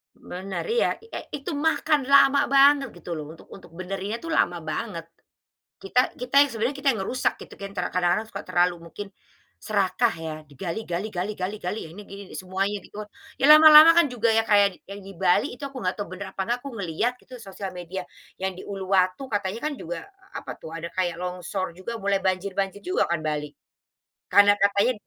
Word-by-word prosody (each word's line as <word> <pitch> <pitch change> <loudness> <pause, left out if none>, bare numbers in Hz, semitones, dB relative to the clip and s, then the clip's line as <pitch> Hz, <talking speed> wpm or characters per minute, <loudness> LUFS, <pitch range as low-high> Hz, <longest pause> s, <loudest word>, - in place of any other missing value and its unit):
Bener 190 +2 -6
iya 475 - +2
e 455 - -7 0.2
itu 285 +4 -5
makan 300 -2 +1
lama 280 0 +5
banget 275 0 +5
gitu 175 0 -9
loh 150 - -6
untuk - - -18
untuk 190 - -13
benerinnya 195 +4 -4
tuh 330 - -5
lama 175 - +2
banget, 170 0 -4 0.8
kita 325 -11 +1
kita 250 +2 -5
yang 285 - +3
sebenarnya 235 +5 -2
kita 280 - -3
yang - - -5
ngerusak 255 +4 0
gitu - - -14
kan 200 - -6
kadang-kadang 180 +2 0
suka 200 -2 -7
terlalu 180 -1 +2
mungkin, 205 +4 -7 0.5
serakah 215 +3 +1
ya 160 -1 -5 0.2
digali 170 +8 -5
gali 175 +4 -2
gali 190 +4 -3 0.2
gali 180 +5 -3
ini 205 - -10
gini 200 -1 -10
semuanya 195 +2 -2
di - - -16
got, 215 - -5 0.3
ya - - -6
lama-lama 310 +1 +10
kan 340 -2 +5
juga 235 -2 +1 0.2
kayak 200 -3 +4
yang 200 0 -8
di 195 - -9
Bali 175 0 +2
itu 250 - -11
aku 270 - -10
nggak 185 - 0
tahu 205 - -4
bener 195 0 -7
apa - - -3 0.2
aku 275 - -6
ngelihat 195 +7 -1
gitu 255 - -12
sosial 195 -2 -7
media 180 +1 -5 0.4
yang 190 -1 -2
di - - -8
Uluwatu 190 +4 0
katanya 205 +1 -2
kan 300 - -5
juga - - -7 0.3
apa - - -6
tuh 160 - -10
ada 165 +1 -5
kayak 175 -2 -1
longsor 180 0 -4
juga 225 +5 -6
mulai 200 0 +2
banjir 185 +1 -1
banjir 195 0 -1
juga 365 +1 0
kan 170 - +1
Bali, 150 -1 -3 0.8
karena 205 0 +6
katanya 200 +4 +3
200 Hz, 185 wpm, -25 LUFS, 180-250 Hz, 0.8 s, lama-lama